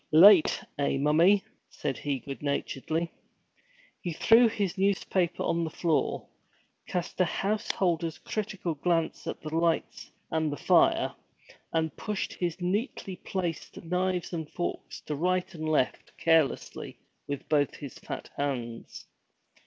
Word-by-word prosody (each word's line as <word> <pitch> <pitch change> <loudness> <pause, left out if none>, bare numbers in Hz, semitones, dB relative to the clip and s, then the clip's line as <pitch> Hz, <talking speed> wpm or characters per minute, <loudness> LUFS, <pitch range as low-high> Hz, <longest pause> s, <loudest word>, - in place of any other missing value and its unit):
'Late, 175 +2 +7 0.2
eh, 140 -1 +1
mommie?' 165 +8 +4 0.3
said 140 -3 -3
he, 145 -2 -1
good 135 +1 -8
naturedly. 150 +3 -2 0.9
He 175 - -3
threw 230 +8 +6
his 205 -5 -1
newspaper 190 -2 +1
on 170 0 +1
the 160 - -2
floor, 160 -1 0 0.6
cast 180 +1 -2
a - - +5
householder's 175 -4 0
critical 195 -5 -3
glance 165 +2 0
at - - -4
the 155 0 -5
lights 165 0 0 0.2
and 160 -1 +1
the 145 - -4
fire, - - +4 0.6
and 160 -2 0
pushed 210 -2 -3
his 175 0 -2
neatly 190 +1 -2
placed 175 -5 -4
knives 180 +1 -1
and 160 -3 -4
forks 175 - -4
to 150 - -4
right 185 +4 0
and 155 -2 -4
left 150 -5 0
carelessly 160 -4 +1 0.3
with 140 0 -4
both 145 -2 +2
his 140 -4 -9
fat - - -6
hands. 120 -5 -4
165 Hz, 130 wpm, -29 LUFS, 150-185 Hz, 0.9 s, Late